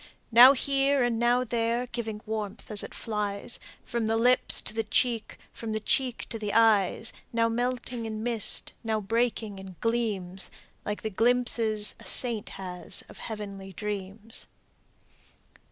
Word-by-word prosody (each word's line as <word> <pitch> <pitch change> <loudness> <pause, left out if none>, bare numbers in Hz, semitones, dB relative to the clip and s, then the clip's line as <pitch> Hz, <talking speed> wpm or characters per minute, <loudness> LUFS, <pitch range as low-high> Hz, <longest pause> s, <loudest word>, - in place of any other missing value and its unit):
"Now 245 +4 +10
here 275 0 +2
and 235 -2 +1
now 240 +1 +3
there, 235 0 0
giving 225 -3 -4
warmth 215 0 -4
as 210 - +4
it - - -7
flies 210 0 -3 0.2
From 235 -2 -2
the 225 0 +2
lips 250 +2 +3
to - - -4
the 225 0 0
cheek, 230 +1 +1 0.2
from 225 -2 -5
the 215 - 0
cheek 250 +2 +1
to 225 - -4
the 210 -1 -3
eyes; 220 -1 +3 0.2
Now 230 0 +2
melting 245 0 -2
in 215 0 -4
mist, 235 -3 -1
and - - -26
now 220 -1 +1
breaking 220 -1 -1
in 190 -1 -10
gleams 205 -6 -1 0.4
Like 210 0 -3
the 220 - -2
glimpses 225 -1 +2
a - - -12
saint 235 -4 0
has 180 -2 -2
of - - -12
heavenly 200 -3 -7
dreams." 210 +2 -5
225 Hz, 155 wpm, -28 LUFS, 210-240 Hz, 0.4 s, Now